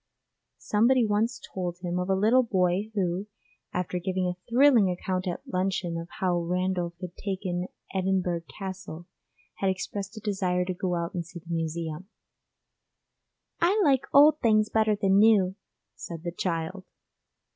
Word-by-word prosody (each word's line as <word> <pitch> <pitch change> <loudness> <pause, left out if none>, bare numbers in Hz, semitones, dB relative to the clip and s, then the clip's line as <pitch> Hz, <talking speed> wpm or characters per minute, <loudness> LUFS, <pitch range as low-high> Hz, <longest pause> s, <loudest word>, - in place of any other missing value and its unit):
Somebody 235 +3 +3
once 215 +3 0
told 175 -2 -3
him 180 0 -3
of 180 +1 -2
a 190 - +3
little 220 +7 +4
boy 190 -2 +1
who, 185 0 -1 0.4
after 180 0 -2
giving 185 +1 -1
a 180 0 -3
thrilling 240 -5 +5
account 185 +1 -2
at 175 - -4
luncheon 185 -2 -1
of 165 0 -5
how 180 -3 +1
Randolph 180 0 -1
had 180 -1 -7
taken 185 -2 -3 0.3
Edinburgh 185 -3 0
Castle, 190 -4 -7 0.5
had 195 - +2
expressed 200 +3 -4
a - - -4
desire 190 -4 0
to 185 - -2
go 180 0 -2
out 170 0 -3
and 175 - -2
see 170 +1 -11
the 170 0 -7
Museum; 165 +2 -3 1.5
'I 370 +6 +3
like 275 -5 +3
old 300 +2 +7
things 215 -2 +3
better 220 -1 +2
than 195 -1 +3
new,' 205 -4 +5 0.4
said 165 -2 -8
the 175 - -3
child! 175 +1 -3
185 Hz, 150 wpm, -27 LUFS, 175-210 Hz, 1.5 s, old